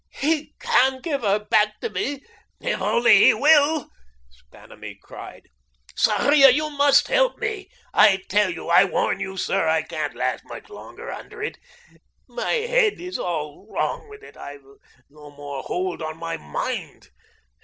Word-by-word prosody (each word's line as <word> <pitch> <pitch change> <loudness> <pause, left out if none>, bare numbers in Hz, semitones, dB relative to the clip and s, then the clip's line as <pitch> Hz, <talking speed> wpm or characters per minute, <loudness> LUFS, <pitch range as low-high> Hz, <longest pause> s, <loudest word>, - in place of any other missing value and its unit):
"He 305 +1 -1
can 260 0 +2
give 285 -3 -3
her 205 -2 +2
back 210 0 +1
to 460 - -3
me 290 - -2
if 280 - -13 0.4
He - - -2
only 475 - +4
will," 300 -1 +3 0.6
Vanamee - - -12
cried. - - -12 0.5
"Sarria, 285 -1 +5
you 305 +4 +1
must 285 -1 +4
help - - +2
me. 405 -3 -4 0.2
I 195 -2 +5
tell 210 +2 +2
you - - -7
I - - +6
warn 480 -1 -1
you, 190 0 -5
sir, 195 -2 0
I 160 0 +1
can't 155 -2 -5
last - - -2
much - - -11
longer - - -10
under 435 0 -9
it. 455 - -5 0.7
My - - -4
head 475 -2 +1
is 365 +1 -6
all 155 +2 -5
wrong 440 - -3
with 425 0 -13
it - - -15
I've 140 -1 -11 0.4
no 150 0 -15
more 145 -1 -8
hold 180 +2 -4
on 155 0 -5
my 165 0 -4
mind. 75 0 -6
260 Hz, 155 wpm, -22 LUFS, -, 0.7 s, I